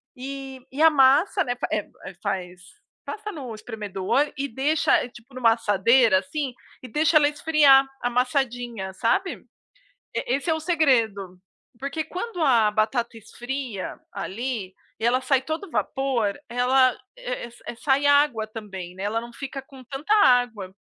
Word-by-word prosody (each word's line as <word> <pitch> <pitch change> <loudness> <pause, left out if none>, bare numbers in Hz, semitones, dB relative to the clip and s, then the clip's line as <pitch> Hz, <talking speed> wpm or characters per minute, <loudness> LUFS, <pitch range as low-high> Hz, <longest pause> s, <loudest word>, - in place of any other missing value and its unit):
e 270 0 -7
e 285 +4 -3
a 320 - +8
massa, 295 +8 +4
né, 245 - -2 0.2
eh, 210 - 0
fa - - -26
eh - - -6
eh, 185 - -21
faz, 180 -1 -3 0.4
passa 420 0 -6
no 260 -7 -7
espremedor 215 +5 -2
e 280 - -1
deixa, 280 +5 +2
eh, 245 - -7
tipo 240 +2 -17
numa 230 -3 +4
assadeira, 215 0 +4
assim, 265 +6 -4 0.3
e 255 - -9
deixa 305 +6 +3
ela 290 -1 +5
esfriar 290 -3 +5 0.2
amassadinha, 245 -5 -1
sabe? 245 - 0 0.7
Eh, - - 0
esse 285 +5 -6
é 320 - +3
o 320 - -3
segredo, 230 - +1 0.4
porque 280 +3 -3
quando 365 -2 -5
a 230 -7 +4
batata 230 +2 0
esfria 245 -1 -6
ali 200 -1 -4 0.3
e - - -3
ela 255 +2 +3
sai 260 0 +2
todo 315 +5 -5
vapor, 260 -9 -1
ela 255 +1 +3 0.2
eh 250 -1 -5
eh - - -12 0.2
eh, 235 - -5
sai 280 +1 +1
água 285 -6 +3
também, 195 -5 -8
né. 190 - -8
Ela 220 +3 0
não 235 0 -10
fica 275 0 -6
com 265 -2 -15
tanta 290 - -1
água. 225 -7 +2
255 Hz, 160 wpm, -24 LUFS, 220-280 Hz, 0.7 s, a